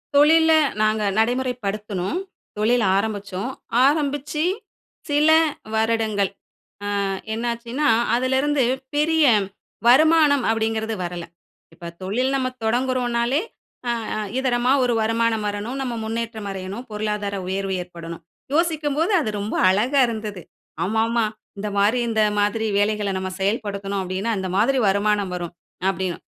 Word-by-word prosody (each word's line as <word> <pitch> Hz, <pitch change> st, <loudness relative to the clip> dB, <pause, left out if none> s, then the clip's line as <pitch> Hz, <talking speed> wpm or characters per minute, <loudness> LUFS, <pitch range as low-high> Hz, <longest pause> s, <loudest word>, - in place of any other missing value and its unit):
தொழில்ல 320 Hz, +3 st, +6 dB, 0.3 s
நாங்க 215 Hz, 0 st, +2 dB
நடைமுறைப்படுத்துனோம். 220 Hz, -, -1 dB, 0.4 s
தொழில் 230 Hz, +3 st, +2 dB
ஆரமிச்சோம். 200 Hz, +2 st, -2 dB, 0.3 s
ஆரம்பிச்சு 290 Hz, +1 st, 0 dB, 0.7 s
சில 295 Hz, +2 st, +3 dB, 0.4 s
வருடங்கள் 220 Hz, -3 st, +1 dB, 0.8 s
அ -, -, 0 dB, 0.3 s
என்னாச்சுன்னா, 235 Hz, +5 st, -2 dB, 0.3 s
அதுலிருந்து 265 Hz, +3 st, +1 dB, 0.3 s
பெரிய 315 Hz, +1 st, +3 dB, 0.6 s
வருமானம் 295 Hz, +1 st, +5 dB
அப்டீங்குறது 225 Hz, 0 st, -1 dB
வரல. 175 Hz, -1 st, -5 dB, 0.5 s
இப்ப 170 Hz, -1 st, -8 dB
தொழில் 250 Hz, +8 st, 0 dB
நம்ம 260 Hz, -1 st, 0 dB, 0.2 s
தொடங்குறோம்னாலே 245 Hz, +2 st, +1 dB, 0.5 s
அ, -, -, +2 dB, 0.2 s
அ -, -, -2 dB, 0.2 s
இதரமா 250 Hz, -1 st, +2 dB
ஒரு 245 Hz, -1 st, +1 dB
வருமானம் 225 Hz, 0 st, +1 dB
வரணும். 205 Hz, +5 st, -4 dB
நம்ப 250 Hz, -3 st, -3 dB
முன்னேற்றம் 225 Hz, -1 st, -4 dB
அடையணும் 195 Hz, +4 st, -6 dB
பொருளாதார 210 Hz, -1 st, -2 dB
உயர்வு 195 Hz, 0 st, -2 dB
ஏற்படணும். 170 Hz, -1 st, -9 dB, 0.3 s
யோசிக்கும்போது 315 Hz, +1 st, +1 dB
அது 220 Hz, -, -1 dB
ரொம்ப 205 Hz, +2 st, -3 dB
அழகா 235 Hz, +9 st, +2 dB
இருந்தது. 215 Hz, -4 st, -5 dB, 0.4 s
ஆமா, 220 Hz, +5 st, 0 dB
ஆமா 235 Hz, -1 st, +1 dB, 0.3 s
இந்த 210 Hz, +1 st, -3 dB
மாரி 210 Hz, +5 st, +3 dB
இந்த 220 Hz, -1 st, +2 dB, 0.2 s
மாதிரி 220 Hz, +2 st, 0 dB
வேலைகள்ல 205 Hz, -1 st, 0 dB
நம்ப 190 Hz, 0 st, -4 dB
செயல்படுத்தனும் 200 Hz, -1 st, -1 dB
அப்டீன்னா, 190 Hz, +4 st, -2 dB
அந்த 190 Hz, 0 st, -3 dB
மாதிரி 260 Hz, +7 st, +3 dB
வருமானம் 200 Hz, -1 st, +1 dB
வரும் 175 Hz, -1 st, -5 dB, 0.4 s
அப்டீன்னு. 185 Hz, -2 st, -3 dB
225 Hz, 115 wpm, -22 LUFS, 200-260 Hz, 0.8 s, தொழில்ல